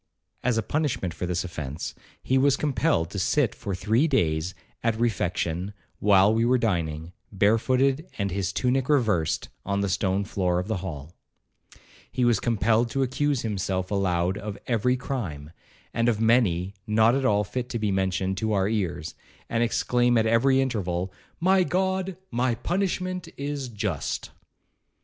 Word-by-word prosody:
As 125 Hz, -2 st, +1 dB
a 115 Hz, -, +1 dB
punishment 140 Hz, -, -1 dB
for 90 Hz, -, -4 dB
this 90 Hz, -1 st, -1 dB
offence, 75 Hz, -4 st, -5 dB, 0.3 s
he 130 Hz, -, +1 dB
was 135 Hz, +1 st, +4 dB
compelled 110 Hz, -, +1 dB
to 100 Hz, -, -3 dB
sit 125 Hz, +7 st, +2 dB
for 100 Hz, -2 st, -4 dB
three 110 Hz, -, +2 dB
days 85 Hz, -, 0 dB, 0.3 s
at 115 Hz, -1 st, 0 dB
refection, 90 Hz, -4 st, -1 dB, 0.3 s
while 100 Hz, 0 st, +5 dB
we 115 Hz, +1 st, +2 dB
were 125 Hz, +2 st, +4 dB
dining, 85 Hz, -7 st, -1 dB, 0.2 s
barefooted 130 Hz, -, +2 dB
and 100 Hz, -2 st, -1 dB
his 95 Hz, -1 st, -1 dB
tunic 125 Hz, +5 st, 0 dB
reversed, 110 Hz, -, +1 dB
on 100 Hz, 0 st, -1 dB
the 100 Hz, -, 0 dB
stone 95 Hz, +1 st, +1 dB
floor 90 Hz, -3 st, 0 dB
of 90 Hz, +1 st, -2 dB
the 110 Hz, -, -1 dB
hall. 85 Hz, -4 st, -7 dB, 1.0 s
He 125 Hz, -, +1 dB
was 120 Hz, -4 st, +3 dB
compelled 115 Hz, 0 st, +2 dB
to 135 Hz, +3 st, 0 dB
accuse 135 Hz, +1 st, 0 dB
himself 95 Hz, -3 st, -2 dB
aloud 95 Hz, -1 st, +1 dB
of 105 Hz, -1 st, -6 dB
every 125 Hz, +2 st, +1 dB
crime, 90 Hz, -, -5 dB, 0.4 s
and 115 Hz, +1 st, +2 dB
of 110 Hz, -3 st, 0 dB
many 105 Hz, -6 st, +2 dB
not 110 Hz, +2 st, +4 dB
at 135 Hz, +1 st, 0 dB
all 105 Hz, -4 st, +3 dB
fit 125 Hz, +4 st, -4 dB
to 120 Hz, -, -2 dB
be 105 Hz, -2 st, 0 dB
mentioned 95 Hz, 0 st, 0 dB
to 110 Hz, +1 st, 0 dB
our 95 Hz, -1 st, +2 dB
ears, 95 Hz, -8 st, -2 dB, 0.4 s
and 115 Hz, -, +1 dB
exclaim 120 Hz, +1 st, +2 dB
at 110 Hz, -, +3 dB
every 125 Hz, +4 st, +4 dB
interval, 95 Hz, -8 st, -2 dB, 0.3 s
'My 190 Hz, +3 st, +4 dB
God, 190 Hz, +2 st, -1 dB
my 120 Hz, 0 st, +1 dB
punishment 185 Hz, -, -2 dB
is 140 Hz, -2 st, -3 dB
just.' 105 Hz, -2 st, -3 dB
110 Hz, 160 wpm, -26 LUFS, 95-125 Hz, 1.0 s, while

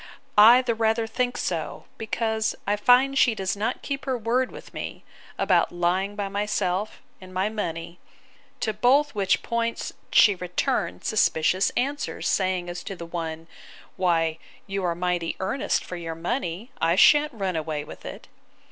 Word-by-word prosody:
—I 235 Hz, +5 st, +8 dB
the 240 Hz, -2 st, 0 dB
rather 225 Hz, 0 st, +1 dB
think 245 Hz, +2 st, -2 dB
so, -, -, -3 dB
because 220 Hz, 0 st, -1 dB
I 205 Hz, -, +1 dB
find 250 Hz, +6 st, +4 dB
she 240 Hz, -4 st, +4 dB
does 190 Hz, -1 st, -2 dB
not 215 Hz, +5 st, -2 dB
keep 275 Hz, -1 st, -4 dB
her 260 Hz, -2 st, 0 dB
word 245 Hz, +3 st, 0 dB
with -, -, -12 dB
me, -, -, -6 dB, 0.3 s
about -, -, +2 dB
lying 180 Hz, +3 st, 0 dB
by 205 Hz, -1 st, -2 dB
myself, 200 Hz, -1 st, -2 dB, 0.2 s
and 185 Hz, 0 st, -11 dB
my 190 Hz, +3 st, 0 dB
money; 170 Hz, -5 st, -5 dB, 0.6 s
to 215 Hz, -, 0 dB
both 260 Hz, +7 st, +3 dB
which 195 Hz, -3 st, +1 dB
points 230 Hz, 0 st, -2 dB, 0.2 s
she 205 Hz, -, +6 dB
returned 180 Hz, +8 st, -2 dB
suspicious 185 Hz, -3 st, +2 dB
answers, 280 Hz, +3 st, -2 dB
saying, 185 Hz, -2 st, 0 dB
as 175 Hz, 0 st, -5 dB
to 195 Hz, -, -5 dB
the 170 Hz, -, -8 dB
one, 165 Hz, -1 st, -5 dB, 0.5 s
Why, 165 Hz, -3 st, +1 dB, 0.3 s
you 195 Hz, -1 st, -3 dB
are 170 Hz, -1 st, 0 dB
mighty 175 Hz, -1 st, -1 dB
earnest 195 Hz, +8 st, -1 dB
for 180 Hz, -, -6 dB
your 165 Hz, -1 st, -5 dB
money; 190 Hz, +4 st, -3 dB
I 165 Hz, +1 st, +3 dB
shan't 295 Hz, +8 st, +5 dB
run 195 Hz, -5 st, -2 dB
away 155 Hz, -2 st, -3 dB
with -, -, -11 dB
it. -, -, -9 dB
200 Hz, 160 wpm, -25 LUFS, 175-230 Hz, 0.6 s, I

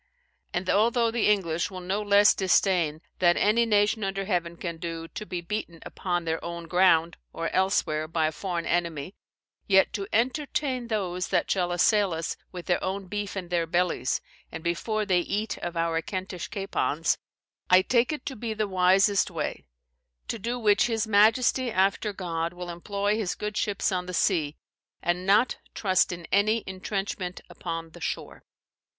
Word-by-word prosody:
And 180 Hz, +1 st, -2 dB
although 230 Hz, +3 st, +3 dB
the 235 Hz, -1 st, +1 dB
English 170 Hz, -5 st, +1 dB
will 185 Hz, -2 st, -7 dB
no 190 Hz, +3 st, -2 dB
less 205 Hz, 0 st, +6 dB
disdain 180 Hz, -5 st, +2 dB, 0.2 s
that 175 Hz, -1 st, +4 dB
any 230 Hz, +3 st, +3 dB
nation 210 Hz, 0 st, +2 dB
under 195 Hz, 0 st, -2 dB
heaven 170 Hz, -3 st, -1 dB
can 170 Hz, -2 st, -5 dB
do, 165 Hz, 0 st, -5 dB
to 210 Hz, -, -7 dB
be 180 Hz, -1 st, -4 dB
beaten, 170 Hz, -2 st, -5 dB
upon 175 Hz, -2 st, -2 dB
their 160 Hz, 0 st, -2 dB
own 170 Hz, 0 st, -6 dB
ground, 170 Hz, -2 st, +3 dB
or 165 Hz, -, -3 dB
elsewhere, 180 Hz, -5 st, +1 dB
by 160 Hz, 0 st, 0 dB
a 155 Hz, -, +1 dB
foreign 175 Hz, +1 st, -3 dB
enemy; 170 Hz, -1 st, -1 dB, 0.5 s
yet 190 Hz, -1 st, +4 dB
to 195 Hz, -1 st, -3 dB
entertain 255 Hz, +1 st, 0 dB
those 185 Hz, -5 st, -2 dB
that -, -, 0 dB
shall 180 Hz, -2 st, +1 dB
assail 195 Hz, +1 st, +3 dB
us 165 Hz, 0 st, -3 dB, 0.2 s
with 180 Hz, -2 st, -8 dB
their 175 Hz, -, +1 dB
own 195 Hz, +1 st, -2 dB
beef 205 Hz, +1 st, -4 dB
in 180 Hz, -2 st, -5 dB
their 170 Hz, -2 st, 0 dB
bellies, 175 Hz, +1 st, 0 dB, 0.3 s
and -, -, -7 dB
before 215 Hz, +5 st, -1 dB
they 185 Hz, -3 st, +3 dB
eat 205 Hz, +5 st, -2 dB
of 175 Hz, -1 st, -5 dB
our 165 Hz, 0 st, +1 dB
Kentish 185 Hz, -1 st, -5 dB
capons, 195 Hz, -6 st, -1 dB, 0.5 s
I 185 Hz, +1 st, +7 dB
take 240 Hz, +4 st, +2 dB
it 305 Hz, -, -5 dB
to 270 Hz, -, -4 dB
be 220 Hz, 0 st, -4 dB
the 215 Hz, -1 st, 0 dB
wisest 190 Hz, +2 st, +3 dB
way; -, -, -4 dB, 0.6 s
to 230 Hz, -, -3 dB
do 235 Hz, +4 st, -2 dB
which 215 Hz, -1 st, +3 dB
his 225 Hz, -2 st, 0 dB
majesty, 225 Hz, +4 st, +4 dB
after 195 Hz, +1 st, +1 dB
God, 170 Hz, -3 st, -3 dB
will 180 Hz, 0 st, -6 dB
employ 200 Hz, +4 st, -1 dB
his 205 Hz, -4 st, -2 dB
good 210 Hz, 0 st, -4 dB
ships 205 Hz, -2 st, 0 dB
on 180 Hz, -1 st, -2 dB
the 180 Hz, -, -4 dB
sea, 155 Hz, -5 st, +1 dB, 0.5 s
and 180 Hz, +2 st, -1 dB
not 210 Hz, +6 st, +4 dB, 0.2 s
trust 185 Hz, -3 st, +2 dB
in 175 Hz, -1 st, -6 dB
any 215 Hz, +3 st, +3 dB
intrenchment 190 Hz, -1 st, -4 dB
upon 165 Hz, -1 st, -5 dB
the 175 Hz, -, -13 dB
shore." -, -, -5 dB
190 Hz, 170 wpm, -27 LUFS, 175-210 Hz, 0.6 s, I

